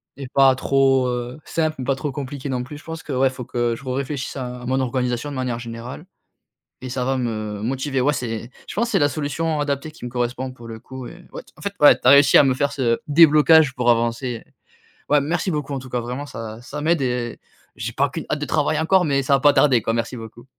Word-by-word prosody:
et 135 -1 -7
pas 135 -1 +5
trop, 135 -1 +2
heu, 125 +2 -4
simples, 155 -1 -1
mais 130 - -3
pas 135 +1 0
trop 140 0 -4
compliqués 140 0 -6
non 125 -2 -2
plus. 145 +4 -9
Je 150 - -15
pense 160 0 -7
que, 150 - -7
ouais, 130 +1 +3
il - - -1
faut 125 - -7
que 120 0 -1
je 140 - -12
re-réfléchisse 135 +1 -4
à 125 -1 -6
mon 130 +1 +1
organisation 125 +1 -1
de 140 - -6
manière 125 -2 -2
générale 120 +5 -8 0.8
et 130 - -6
ça 125 0 -2
va 135 +1 0
me 110 -4 -3
motiver, 135 +3 -2
ouais, 145 +4 +2
c'est 115 -2 -4 0.2
je - - -8
pense, 235 +3 0
c'est - - +2
la 145 -1 +3
solution 155 +1 -2
adaptée 145 +1 -2
qui 150 -5 -10
me 125 - -6
correspond, 125 +1 -2
pour 120 -2 -12
le 110 -1 -7
coup, 130 +1 -9
et 180 - -11
ouais - - -8
t - - -23
en - - -14
fait, 200 0 -4
ouais, 145 - +8
tu - - -14
as - - +10
réussi 140 0 +7
à - - +8
me 135 -2 +2
faire 140 +2 0
ce 120 -4 0
déblocage 155 -2 +6
pour 120 -1 +2
avancer. 120 +1 0 0.7
Ouais, 145 -1 +4
merci 170 +5 -1
beaucoup 150 -3 -3
en 135 - -2
tout 130 0 -11
cas, 125 0 -2
vraiment 125 +4 -5
ça 115 -4 -8
ça 145 +4 -7
m'aide 165 0 +2
et 125 -2 -2 0.4
j'ai 115 0 -4
pas 140 +3 +1
qu'une 160 +2 -6
hâte 150 - -1
de 145 - -3
travailler 155 +1 0
encore, 180 +3 +3
mais 140 -2 +1
ça 140 - +1
va - - +1
pas 145 +1 +5
tarder, 130 -6 +4
quoi, 115 - -1
merci 115 +2 -2
beaucoup. 115 +1 -11
130 Hz, 255 wpm, -22 LUFS, 120-145 Hz, 0.8 s, as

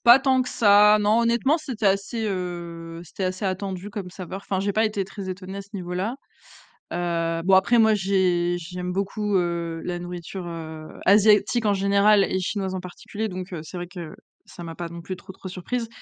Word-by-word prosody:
pas 240 +2 +9
tant 265 -1 +3
que 255 - -6
ça, 210 0 +6
non. 210 +2 +3
Honnêtement, 235 +7 +2
c'était 255 -9 -3
assez, 200 +4 +1
heu, 170 -3 -5
c'était 190 +3 -5
assez 185 +2 -2
attendu 190 +1 -3
comme 195 -3 -6
saveur. 190 +1 -7
Enfin, 190 -1 -1
j'ai 200 +1 0
pas 220 +2 +2
été 210 -3 0
très 195 0 -8
étonnée, 185 +1 -6
à - - -5
ce 200 - -20
niveau 180 -2 -4
là. 205 +8 -2 0.8
Heu, 165 -1 -1
bon 190 +1 +5
après, 230 +5 +4
moi, 220 -1 +6
j'ai 185 -3 +2
j'aime 180 +1 -5
beaucoup, 200 +2 -1
heu, 170 -2 -2
la 175 -1 -3
nourriture, 175 +1 -6
heu, 160 -2 -7 0.2
asiatique 210 +3 +5
en 205 - +4
général 200 +1 +4
et 190 - 0
chinoise 190 0 -2
en - - -2
particulier, 200 +4 -5
donc, 185 0 -6
heu, 165 - -4
c'est 180 - -8
vrai 175 0 -5
que, 175 -3 -8 0.3
ça 175 - -11
m'a 165 -1 -6
pas 170 -1 -5
non 170 0 -8
plus 185 +3 -5
trop, 185 - -11
trop 190 0 -10
surprise. 225 +6 -3
190 Hz, 205 wpm, -24 LUFS, 175-210 Hz, 0.8 s, pas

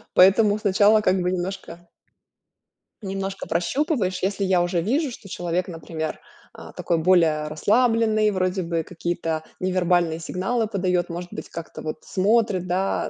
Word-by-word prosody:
Поэтому 205 +3 +5
сначала 210 +1 +4
как 185 -2 +2
бы 180 +1 0
немножко 175 -2 -5 1.2
немножко 195 0 -4
прощупываешь, 190 - -1
если 200 +1 0
я 185 -2 +3
уже 175 -1 0
вижу, 270 - 0
что 205 -4 -11
человек, 175 +1 -2
например, 160 -2 -5 0.3
а, - - -11
такой 170 - -1
более 160 -3 +3
расслабленный, 215 +5 +2
вроде 185 0 -1
бы 165 -1 -1
какие-то 165 -2 -3 0.2
невербальные 175 -3 +1
сигналы 190 +7 -1
подает, 180 -4 -1
может 175 +1 -6
быть, - - -7
как-то 165 -1 -8
вот 155 - -4
смотрит, 200 -2 +1
да, 185 +2 -1
185 Hz, 140 wpm, -23 LUFS, 175-205 Hz, 1.2 s, Поэтому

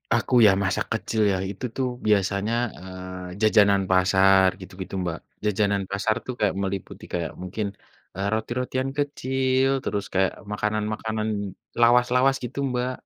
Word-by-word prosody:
Aku - - -1
ya 105 - +8
masa 95 -1 0
kecil 110 -1 -1
ya, - - 0
itu 100 +6 -6
tuh 130 -1 0 0.2
biasanya, 100 +1 +2 0.3
eee, 95 0 -8
jajanan 100 -2 +5
pasar 95 +1 +5
gitu-gitu, 95 +1 -9
Mbak. 85 -2 -2 0.3
Jajanan 100 -1 +1
pasar 105 +2 +1
tuh 125 - -4
kayak 105 -3 +1
meliputi 95 -1 -5
kayak 85 -2 -2
mungkin, 95 +4 -3 0.5
eee, 100 +1 -2
roti-rotian 125 +4 -2
kecil, 130 -2 +1
terus 100 -1 -2
kayak 95 0 +2 0.2
makanan-makanan 110 +1 -2 0.5
lawas-lawas 125 +3 +4
gitu 125 +3 -5
Mbak. 125 +1 -1
105 Hz, 135 wpm, -25 LUFS, 95-120 Hz, 0.5 s, ya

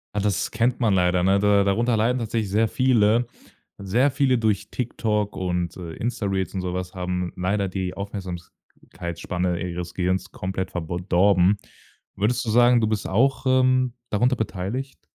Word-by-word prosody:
Ja, - - +1
das 100 -3 0
kennt 120 +2 0
man 110 -4 +3
leider, 90 -1 +2
ne? 95 +1 +3
Da 100 -1 +4
darunter 115 +4 +1
leiden 120 +4 +1
tatsächlich 110 -3 -2
sehr 110 +3 +2
viele. 120 -1 +3 0.5
Sehr 120 +9 +1
viele 130 -2 +2
durch 110 -3 0
TikTok 105 -4 -2
und, 90 -1 -2
äh, 85 -3 -7
Insta-Reels 100 -5 -2
und 95 - -2
so 90 -1 -3
was 90 0 -4
haben 90 -1 -3
leider 100 +1 0
die 95 -1 -3
Aufmerksamkeitsspanne 90 -2 -5
ihres 90 -1 -5
Gehirns 95 +1 -1
komplett 95 0 -4
verb 80 -3 -4 0.2
dorben. 95 +1 +4 0.6
Würdest 115 +5 0
du - - -2
sagen, 120 +1 +5
du 110 - +2
bist 110 -2 -2
auch, 130 +7 +1
ähm, 130 -1 +3 0.2
darunter 125 +5 +2
beteiligt? 110 +6 -4
100 Hz, 160 wpm, -24 LUFS, 90-115 Hz, 0.6 s, sagen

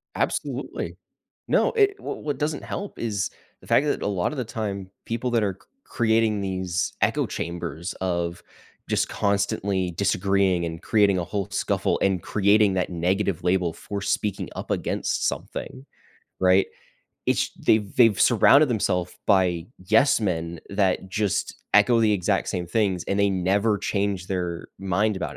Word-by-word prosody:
Absolutely. - - -3 0.5
No, - - +3
it 405 -3 +3
wh - - -16 0.2
what 145 -2 -2
doesn't 150 0 -2
help 200 - -6
is 105 -4 -1 0.3
the - - -16
fact 145 - +4
that - - 0
a - - -1
lotta 100 +7 -1
the 130 - -2
time, 100 -4 -4 0.2
people 120 +2 -2
that 115 -3 +2
are 95 -2 -2
c-creating 115 - 0
these 95 -2 -2
echo - - +2
chambers 85 +1 -5
of 85 -2 -2 0.5
just - - +1
constantly 100 -2 0
disagreeing 95 -1 +1
and 80 0 -6
creating 100 -3 +3
a 90 - -1
whole 100 +3 -3
scuffle - - 0
and 95 -2 +2
creating 105 0 +3
that 90 -1 0
negative 90 +1 0
label 90 -1 +1
for 100 +5 -6
speaking 100 0 -1
up - - -6
against - - -1
something, 65 - -7 0.5
right? 95 +1 +4 0.6
It - - +2
sh - - +1
they've 105 -3 +1
they've 115 -6 +5
surrounded 145 0 +6
themself 90 -6 -1
by 90 -4 +2 0.2
yes 135 +6 +4
men 85 -4 -2
that 95 -1 0
just 100 0 -1 0.2
echo 105 +3 +6
the 110 -2 +4
exact 90 -4 0
same 90 -1 -2
things, 95 -2 0
and 100 - -1
they 100 0 +3
never 100 +3 +1
change 100 -2 -1
their 90 -3 -3
mind 100 +2 0
about - - -4
100 Hz, 155 wpm, -24 LUFS, 90-105 Hz, 0.6 s, surrounded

